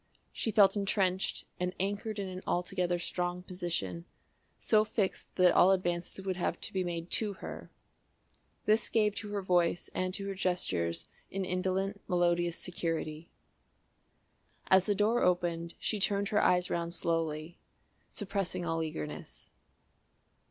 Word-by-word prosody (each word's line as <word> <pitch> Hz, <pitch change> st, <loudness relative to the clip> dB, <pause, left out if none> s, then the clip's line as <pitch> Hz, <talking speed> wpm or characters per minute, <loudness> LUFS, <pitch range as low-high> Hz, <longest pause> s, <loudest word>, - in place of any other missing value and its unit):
She -, -, -1 dB
felt 205 Hz, -2 st, +6 dB
entrenched 195 Hz, -2 st, 0 dB
and 180 Hz, +1 st, -1 dB
anchored 205 Hz, +3 st, -1 dB
in 200 Hz, -1 st, -2 dB
an 185 Hz, 0 st, -6 dB
altogether 175 Hz, 0 st, 0 dB
strong 175 Hz, +1 st, -2 dB
position, 165 Hz, -, -3 dB, 0.5 s
so 215 Hz, -1 st, +4 dB
fixed 210 Hz, -3 st, -2 dB
that 180 Hz, -1 st, +6 dB
all 185 Hz, -, +6 dB
advances 180 Hz, 0 st, 0 dB
would 185 Hz, -1 st, -1 dB
have 180 Hz, -, -1 dB
to -, -, -3 dB
be 190 Hz, -1 st, +1 dB
made 170 Hz, -1 st, -4 dB
to 210 Hz, -2 st, +2 dB
her. -, -, -8 dB, 1.0 s
This 215 Hz, +1 st, +3 dB
gave 210 Hz, -2 st, +3 dB
to 210 Hz, -, -4 dB
her 205 Hz, -1 st, -2 dB
voice 175 Hz, -2 st, +1 dB
and 185 Hz, 0 st, -1 dB
to 200 Hz, -, -5 dB
her 195 Hz, -, -2 dB
gestures 95 Hz, -, -1 dB, 0.2 s
an 195 Hz, 0 st, -2 dB
indolent 190 Hz, +2 st, -1 dB
melodious 175 Hz, -1 st, +2 dB
security. 165 Hz, -2 st, -3 dB, 1.4 s
As 190 Hz, 0 st, +6 dB
the 205 Hz, -, +2 dB
door 215 Hz, +4 st, +2 dB
opened 170 Hz, -2 st, +1 dB
she 215 Hz, -, -1 dB
turned 200 Hz, +1 st, +1 dB
her 210 Hz, -, +3 dB
eyes 180 Hz, 0 st, +3 dB
round 170 Hz, 0 st, 0 dB
slowly, 165 Hz, -1 st, -1 dB, 0.5 s
suppressing 195 Hz, -3 st, -2 dB
all 165 Hz, -1 st, 0 dB
eagerness. 155 Hz, -1 st, -6 dB
180 Hz, 140 wpm, -32 LUFS, 170-195 Hz, 1.4 s, felt